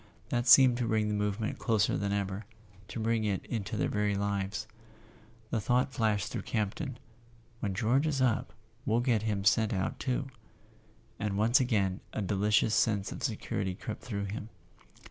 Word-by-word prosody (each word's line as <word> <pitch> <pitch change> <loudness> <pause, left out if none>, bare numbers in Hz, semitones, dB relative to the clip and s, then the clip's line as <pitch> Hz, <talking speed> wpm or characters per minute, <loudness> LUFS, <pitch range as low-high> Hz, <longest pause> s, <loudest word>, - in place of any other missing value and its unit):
That 120 +1 0
seemed 130 -1 +8
to 120 - 0
bring 110 -1 +1
the - - 0
movement 105 +1 -1
closer 110 -3 +2
than 100 0 -1
ever, 100 0 -2 0.4
to 115 - -6
bring 110 0 +1
it 100 -3 -1
into 110 -2 -3
their - - +1
very 105 -1 0
lives. 100 +1 -2 0.9
The 110 - 0
thought 125 +4 +1
flashed 105 -5 0
through - - -3
Campton: 115 +5 -3 0.6
"When 100 -4 -2
George 125 +8 +2
is 145 -3 0
up, 125 -4 +1 0.3
we'll 115 0 +2
get 120 -4 +2
him 105 -3 -1
sent 110 +2 +3
out 95 -1 -2
too"; 130 +1 -1 0.9
and 105 -2 -1
once 115 +6 +4
again 105 -7 +1
a - - -2
deli¬ 100 +2 0
cious 105 +1 +4
sense 105 -4 +2
of - - -7
security 95 -2 -2
crept 110 - -6
through 100 -4 -3
him. 105 +2 -6
110 Hz, 170 wpm, -30 LUFS, 100-120 Hz, 0.9 s, seemed